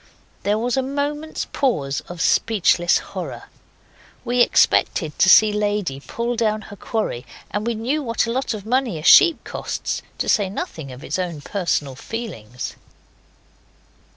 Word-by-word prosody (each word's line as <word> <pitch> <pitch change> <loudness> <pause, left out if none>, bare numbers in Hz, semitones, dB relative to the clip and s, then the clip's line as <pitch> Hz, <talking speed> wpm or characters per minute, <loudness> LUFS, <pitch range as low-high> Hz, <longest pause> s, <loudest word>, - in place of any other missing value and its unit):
There 205 +1 +1
was 240 +3 -1
a - - +3
moment's 290 +3 -3
pause 145 - 0
of 175 -1 -6
speechless 180 -5 +3 0.2
horror. - - -6 0.8
We 245 0 +2
expected 160 -8 +2
to 190 - +5
see 215 +2 +7
Lady 205 -9 -1
pull 235 +11 -3
down 215 -2 0
her - - -8
quarry, 205 - -3 0.3
and 205 +3 -2
we 235 - 0
know 255 +8 -1
what 230 -4 0
a 230 - -3
lot 260 -1 -1
of 205 -1 -8
money 245 -5 0
a 155 - -7
sheep 335 - +7
costs, - - -4 0.2
to - - -2
say 205 -5 +2
nothing 160 -7 -6
of 125 +2 -11
its 155 - -3
own 170 -5 -3
personal 150 -6 -1
feelings. 125 - -6
215 Hz, 155 wpm, -21 LUFS, 170-240 Hz, 0.8 s, see